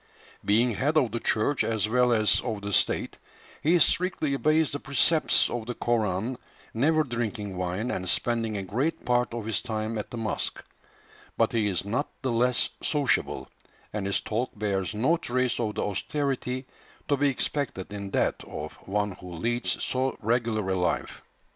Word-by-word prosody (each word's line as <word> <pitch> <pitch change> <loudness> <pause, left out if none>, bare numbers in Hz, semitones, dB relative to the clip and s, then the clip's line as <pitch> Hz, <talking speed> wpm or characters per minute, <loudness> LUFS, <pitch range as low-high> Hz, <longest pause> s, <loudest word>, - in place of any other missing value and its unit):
Being 115 +4 +3
head 145 +8 +1
of 130 -7 +3
the 115 - -2
church 115 +6 +2
as 110 -2 0
well 125 +2 +3
as 110 -2 +3
of 110 -4 -4
the 100 0 -3
state, - - +1 0.4
he 170 +4 +4
strictly 175 -4 +2
obeys 155 +2 +2
the 145 - -3
precepts 150 +4 +3
of 120 -2 -4
the 120 - -3
Koran, 115 +1 0 0.3
never 155 +7 +3
drinking 115 -6 -3
wine, 90 +7 -2
and 90 0 -2
spending 115 -1 0
a 100 - -3
great 125 - -1
part 120 0 +2
of 115 -2 -4
his 110 -3 0
time 110 -2 -3
at 105 - -5
the 120 - -6
mosque; 110 -2 -2 0.7
but - - +3
he 110 -3 +1
is 95 -1 0
not 125 +8 -1
the 130 - 0
less 120 +1 +3
sociable, 145 -4 0 0.5
and 105 -2 -2
his 100 - +1
talk 120 +4 -1
bears 100 -1 -1
no 135 +11 +3
trace 125 -5 0
of 110 -3 -1
the - - -1
austerity 130 +4 -2 0.4
to 145 - +3
be 140 +1 +3
expected 130 -7 -2
in 100 -1 -5
that - - 0
of - - -6
one 105 +1 0
who 90 -1 -10
leads 120 +8 -1
so 130 +1 0
regular 115 -2 0
a 95 - +1
life. 90 -1 -1
115 Hz, 175 wpm, -27 LUFS, 105-130 Hz, 0.7 s, he